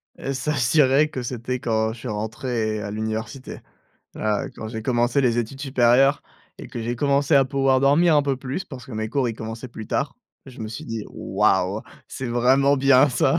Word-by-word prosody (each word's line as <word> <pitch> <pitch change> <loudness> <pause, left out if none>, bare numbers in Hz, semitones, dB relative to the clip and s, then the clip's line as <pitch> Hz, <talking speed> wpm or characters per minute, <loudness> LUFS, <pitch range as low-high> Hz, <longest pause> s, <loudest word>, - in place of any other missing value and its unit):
Heu, 135 - -4
s'assurer 140 +1 +2
que 130 - -5
c'était 125 +1 -4
quand 110 -2 0
je 115 - -12
suis 125 - -7
rentré 110 0 -2
à 100 0 -5
l'université. 110 +4 -5 0.6
Là, 105 -1 -1
quand 110 - -7
j'ai 110 -1 -6
commencé 120 +2 +1
les 120 -3 +2
études 120 +4 -3
supérieures, 135 0 +3 0.4
et - - -8
que 120 - -6
j'ai 120 +2 -2
commencé 140 +2 +2
à 135 - +6
pouvoir 135 -1 +2
dormir 150 +5 +4
un 145 - +4
peu 140 -1 0
plus, 135 +8 -5
parce 130 -8 -10
que 130 - -10
mes 110 0 -3
cours, 125 +1 0
ils 115 - -4
commençaient 115 +2 -7
plus 110 -2 -9
tard, 140 0 -1 0.3
je 125 -3 -12
me 110 - -4
suis 110 - -7
dit: 115 -2 -5
«Waouh!» - - 0 0.3
C'est 130 - -5
vraiment 130 +4 +3
bien 135 +1 +5
ça. 135 +5 +2
125 Hz, 195 wpm, -23 LUFS, 115-135 Hz, 0.6 s, à